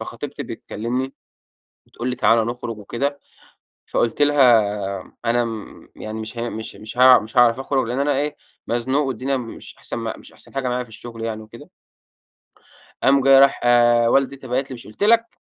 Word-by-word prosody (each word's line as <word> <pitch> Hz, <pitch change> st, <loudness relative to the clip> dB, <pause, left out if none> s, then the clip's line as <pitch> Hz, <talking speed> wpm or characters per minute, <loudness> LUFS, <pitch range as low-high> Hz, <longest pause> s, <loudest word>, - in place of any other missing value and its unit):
فخطيبتي -, -, -6 dB
بتكلمني 125 Hz, +5 st, -4 dB, 0.7 s
بتقول 120 Hz, +2 st, -5 dB
لي 125 Hz, -, -2 dB
'تعال 115 Hz, -1 st, +3 dB
نخرج 120 Hz, -1 st, -5 dB
وكده.' 140 Hz, +7 st, -3 dB, 0.7 s
فقلت 120 Hz, +4 st, 0 dB
لها 145 Hz, 0 st, +3 dB, 0.8 s
'أنا 120 Hz, +1 st, +2 dB
آمم، 115 Hz, -3 st, -7 dB
يعني 110 Hz, +1 st, -6 dB
مش 110 Hz, +2 st, -8 dB
هين 120 Hz, 0 st, -3 dB
مش 110 Hz, 0 st, -7 dB
مش 110 Hz, +3 st, -10 dB
ه 130 Hz, 0 st, +8 dB
مش 110 Hz, +4 st, -10 dB
هاعرف 120 Hz, 0 st, +5 dB
أخرج 135 Hz, -2 st, 0 dB
لأن 125 Hz, +3 st, -2 dB
أنا 145 Hz, +1 st, +2 dB
إيه 150 Hz, +1 st, -2 dB, 0.3 s
مزنوق 130 Hz, +5 st, 0 dB
والدنيا 135 Hz, +2 st, -2 dB
مش 120 Hz, -3 st, -8 dB
أحسن -, -, -6 dB
مش -, -, -7 dB
أحسن -, -, -18 dB
حاجة 135 Hz, -2 st, -1 dB
معايا 125 Hz, 0 st, -1 dB
في -, -, -20 dB
الشغل 115 Hz, 0 st, -9 dB
يعني 110 Hz, -1 st, -4 dB
وكده.'" 110 Hz, -, -13 dB, 1.3 s
قام 135 Hz, 0 st, +4 dB
جا 135 Hz, 0 st, +7 dB
راح 140 Hz, 0 st, +4 dB, 0.5 s
ولدي 135 Hz, +2 st, +2 dB
أنت 135 Hz, -1 st, -12 dB
باعت 130 Hz, +2 st, -2 dB
لي: 130 Hz, -, -5 dB
"مش 120 Hz, -, -11 dB
قلت 110 Hz, -, -10 dB
لك؟ 230 Hz, +2 st, +5 dB
125 Hz, 175 wpm, -21 LUFS, 115-135 Hz, 1.3 s, ه